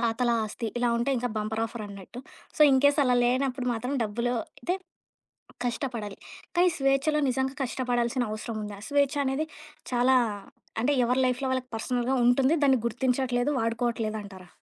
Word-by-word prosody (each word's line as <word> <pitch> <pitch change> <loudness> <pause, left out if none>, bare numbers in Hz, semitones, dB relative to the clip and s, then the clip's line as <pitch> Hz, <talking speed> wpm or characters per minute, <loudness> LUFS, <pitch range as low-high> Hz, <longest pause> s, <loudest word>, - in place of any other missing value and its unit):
తాతల 235 +1 +1
ఆస్తి 220 +2 -5
ఇలా 240 0 +2
ఉంటే 240 +4 0
ఇంకా 245 +1 -1
బంపర్ 220 +1 -2
ఆఫర్ 225 -1 -7
అన్నట్టు. 200 +4 -10 0.4
సో, - - -11
ఇన్‌కేస్ 285 +3 +4
అలా 250 -1 +3
లేనప్పుడు 255 0 0
మాత్రం 250 +5 -3
డబ్బులో 235 +4 -1 0.3
అయితే 360 - 0 0.9
కష్టపడాలి. 235 -4 -3 0.4
కానీ 360 +1 +5
స్వేచ్ఛలో 275 +3 +2
నిజంగా 265 +1 -1
కష్టపడాల్సిన 245 -1 0
అవసరం 215 +1 -5
ఉందా? 205 -1 -7
స్వేచ్ఛ 285 0 +2
అనేది 275 +4 0 0.5
చాలా 250 +2 +4 0.6
అంటే, 280 +5 +2
ఎవరి 250 +2 +2
లైఫ్‌లో 255 +1 -1
వాళ్ళకి 255 -1 -2
పర్సనల్‌గా 245 +3 -1
ఉంటుంది. 265 +5 +4
దాన్ని 265 -2 +5
గుర్తించట్లేదు 250 +2 0
వాడుకోట్లేదంటారా? 220 -5 -2
245 Hz, 140 wpm, -27 LUFS, 230-265 Hz, 0.9 s, కానీ